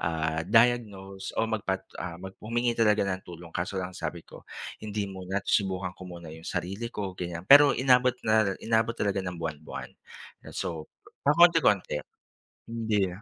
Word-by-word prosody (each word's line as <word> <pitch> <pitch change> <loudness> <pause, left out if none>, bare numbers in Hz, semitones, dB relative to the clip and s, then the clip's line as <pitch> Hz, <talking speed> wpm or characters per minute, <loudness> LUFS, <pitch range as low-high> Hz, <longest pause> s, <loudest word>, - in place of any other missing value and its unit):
ah, 80 -1 -1
diagnose 100 -5 +2
o - - +2
magpa 95 -4 -2 0.2
ah, 85 0 -5
mag 95 +1 -8
humingi 120 +2 0
ng 105 -4 +2
tulong. 85 -1 -10
Kaso 90 +3 -2
lang 90 0 -4
sabi 85 -2 -5
ko, - - -13 0.4
"Hindi 105 -1 -2
muna, 95 0 -3
susubukan 95 -2 0
ko - - -13
muna 85 -3 -9
'yong 80 +1 -9
sarili 100 +6 -3
ko," 100 -5 -4
ganyan. 85 -1 -5
Pero, 140 -1 +8
inabot 125 -1 +4
na 110 -3 +3
inabot 115 +1 +1
talaga 100 -1 0
ng 90 -2 -5
buwan-buwan. 80 -2 -6 0.5
'Yan, - - -11
so, 80 -2 -4 0.3
pa 140 - +4
konti-konti 160 - +4 0.7
hindi. 110 -4 0
95 Hz, 155 wpm, -28 LUFS, 90-115 Hz, 0.7 s, Pero